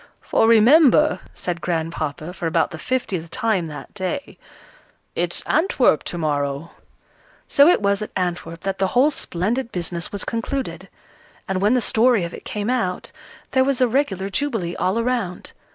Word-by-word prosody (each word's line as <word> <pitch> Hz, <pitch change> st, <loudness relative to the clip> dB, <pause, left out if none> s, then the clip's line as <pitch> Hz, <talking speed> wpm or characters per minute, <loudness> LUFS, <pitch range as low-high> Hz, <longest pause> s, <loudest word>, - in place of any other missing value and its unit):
"For 225 Hz, -, +2 dB
remember," 275 Hz, +6 st, +6 dB
said 175 Hz, -2 st, -4 dB
Grandpapa, 160 Hz, 0 st, -3 dB
for 175 Hz, -, -3 dB
about 165 Hz, 0 st, +1 dB
the 160 Hz, -, -7 dB
fiftieth 190 Hz, -8 st, -2 dB
time 215 Hz, -6 st, 0 dB
that 150 Hz, -1 st, -9 dB
day, 205 Hz, +8 st, -4 dB, 0.8 s
"it's -, -, -1 dB
Antwerp 275 Hz, -, +2 dB
to 175 Hz, -, -4 dB
morrow!" 145 Hz, -1 st, -2 dB, 0.8 s
So 285 Hz, +1 st, +6 dB
it 340 Hz, -11 st, +4 dB
was 200 Hz, +1 st, +2 dB
at 215 Hz, -, -4 dB
Antwerp 175 Hz, -2 st, -3 dB
that 195 Hz, 0 st, -3 dB
the 190 Hz, -, +2 dB
whole 280 Hz, +5 st, +5 dB
splendid 230 Hz, -, -2 dB
business 170 Hz, -1 st, -3 dB
was 200 Hz, -, -3 dB
concluded. 225 Hz, -6 st, -4 dB, 0.6 s
And 190 Hz, -1 st, -1 dB
when 210 Hz, +5 st, +3 dB
the 250 Hz, -, +2 dB
story 225 Hz, -2 st, +3 dB
of 170 Hz, -, -5 dB
it -, -, -10 dB
came 210 Hz, +3 st, -2 dB
out, 185 Hz, -8 st, -2 dB, 0.4 s
there 260 Hz, 0 st, +4 dB
was 275 Hz, -1 st, 0 dB
a 255 Hz, -, +4 dB
regular 220 Hz, -7 st, 0 dB
jubilee 205 Hz, -8 st, -1 dB
all 190 Hz, +4 st, 0 dB
around. 230 Hz, -6 st, -2 dB
195 Hz, 160 wpm, -22 LUFS, 170-250 Hz, 0.8 s, remember